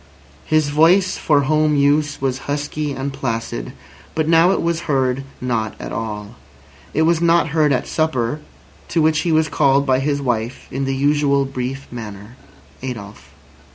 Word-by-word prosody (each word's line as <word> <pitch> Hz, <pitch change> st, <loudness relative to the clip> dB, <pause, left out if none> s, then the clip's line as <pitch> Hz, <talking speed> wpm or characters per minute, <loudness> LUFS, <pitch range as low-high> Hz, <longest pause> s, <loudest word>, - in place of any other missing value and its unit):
His 155 Hz, -2 st, +2 dB
voice 175 Hz, +6 st, +4 dB
for 145 Hz, -2 st, +3 dB
home 155 Hz, +2 st, +2 dB
use 145 Hz, +1 st, +2 dB
was 135 Hz, 0 st, -3 dB
husky 145 Hz, +1 st, -2 dB
and 135 Hz, 0 st, -4 dB
placid, 115 Hz, -, -3 dB, 0.4 s
but 160 Hz, -1 st, 0 dB
now 165 Hz, +2 st, +5 dB
it 195 Hz, -, +2 dB
was 170 Hz, -1 st, -2 dB
heard 130 Hz, -1 st, +1 dB, 0.2 s
not 115 Hz, -4 st, -2 dB
at -, -, -6 dB
all. 105 Hz, 0 st, -5 dB, 0.5 s
It 155 Hz, -, +1 dB
was 165 Hz, 0 st, +2 dB
not 170 Hz, -1 st, +3 dB
heard 150 Hz, -1 st, +2 dB
at 125 Hz, -2 st, +1 dB
supper, 150 Hz, -4 st, -1 dB, 0.5 s
to 170 Hz, -, 0 dB
which 155 Hz, 0 st, +3 dB
he 175 Hz, -, 0 dB
was 160 Hz, 0 st, +3 dB
called 140 Hz, -2 st, +2 dB
by 130 Hz, -1 st, +2 dB
his 140 Hz, +1 st, 0 dB
wife 120 Hz, -2 st, -2 dB
in 135 Hz, +1 st, -2 dB
the 135 Hz, 0 st, -1 dB
usual 140 Hz, 0 st, +2 dB
brief 135 Hz, +1 st, -4 dB
manner: 105 Hz, -1 st, -8 dB, 0.5 s
"Adolf." 110 Hz, -6 st, -8 dB
140 Hz, 160 wpm, -20 LUFS, 125-155 Hz, 0.5 s, now